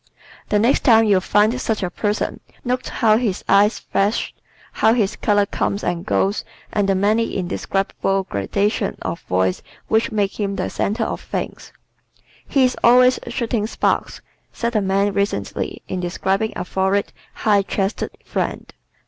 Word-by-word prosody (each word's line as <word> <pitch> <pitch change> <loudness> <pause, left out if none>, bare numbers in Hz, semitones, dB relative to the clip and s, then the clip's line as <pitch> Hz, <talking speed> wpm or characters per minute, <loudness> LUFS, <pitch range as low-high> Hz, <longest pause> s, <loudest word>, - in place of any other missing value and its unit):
The 210 - +3
next 230 +6 +3
time 225 -3 +5
you 200 -3 +4
find 210 +6 +2
such 220 -3 -1
a 180 - -2
person 210 +1 -2 0.3
note 250 +1 -1
how 215 -1 +3
his 220 -6 -1
eyes 205 +2 +4
flash, 200 +3 -1 0.4
how 220 - +3
his 210 -3 +1
color 205 -1 +2
comes 200 0 -2
and 175 -1 -1
goes 200 0 0 0.3
and 200 -1 +1
the 195 - +3
many 215 +4 +1
indescribable 195 +1 -1
gradations 200 - -1
of 170 - -4
voice 90 0 0 0.3
which 220 +1 +2
make 205 -1 -1
him 200 -1 -1
the - - -3
center 220 +3 -1
of - - -3
things. - - -5 0.8
"He 275 - +3
is 255 0 +2
always 250 +1 +6
shooting 235 -3 -1
sparks," - - -1 0.3
said 235 0 -3
a 215 - +3
man 195 +1 +1
recently 200 - -2
in 185 - -3
describing 190 +4 -1
a 180 - -4
florid, 190 +2 0 0.2
high 205 -2 +3
chested 195 +1 -2 0.2
friend. - - -3
205 Hz, 155 wpm, -20 LUFS, 195-220 Hz, 0.8 s, always